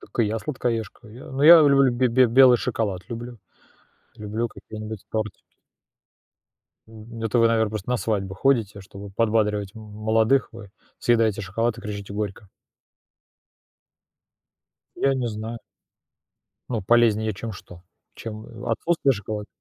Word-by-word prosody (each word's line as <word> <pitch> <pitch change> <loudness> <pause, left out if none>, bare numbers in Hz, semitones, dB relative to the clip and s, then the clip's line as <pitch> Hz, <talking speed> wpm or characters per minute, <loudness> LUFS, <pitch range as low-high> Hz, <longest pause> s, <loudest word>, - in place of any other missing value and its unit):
Так - - -14
и 115 - +4
я 110 +2 -2
сладкоежка. 115 -5 -4
Я 115 +4 -12
но 135 +2 -1
я 165 0 +10
люблю, 135 -2 +4
бе 125 +1 +1
бе 125 +2 +4
белый 125 +1 +6
шоколад 95 -6 -3
люблю, 120 0 -7 0.8
люблю 105 +3 -3
какие-нибудь 110 -2 -9
тортики. 110 -1 -5 1.4
Мгм, 115 +1 -11
это 115 +2 +1
вы, 115 - +5
наверно, 110 -2 +1
просто 110 +1 -5
на 125 - +2
свадьбу 100 -4 -2
ходите, 110 -4 +1
чтобы 100 +1 -11
подбадривать 105 -2 0
м 110 - -10
молодых, 110 +4 +1
вы 110 -4 -11 0.3
съедаете 115 -3 +2
шоколад 110 +5 -1
и - - -7
кричите 100 -1 -7
горько. 105 -1 -5 2.5
Я 135 0 +2
не 125 -3 -1
знаю. 110 +2 -6 1.1
Ну, 115 -4 -2
полезнее 110 0 +3
чем 105 +3 -6
что? 90 -2 -13 0.3
Чем, 110 -1 -8
э, 115 0 -7
отсутствие 160 +1 +1
шоколада? 105 -1 -5
110 Hz, 140 wpm, -24 LUFS, 105-120 Hz, 2.5 s, я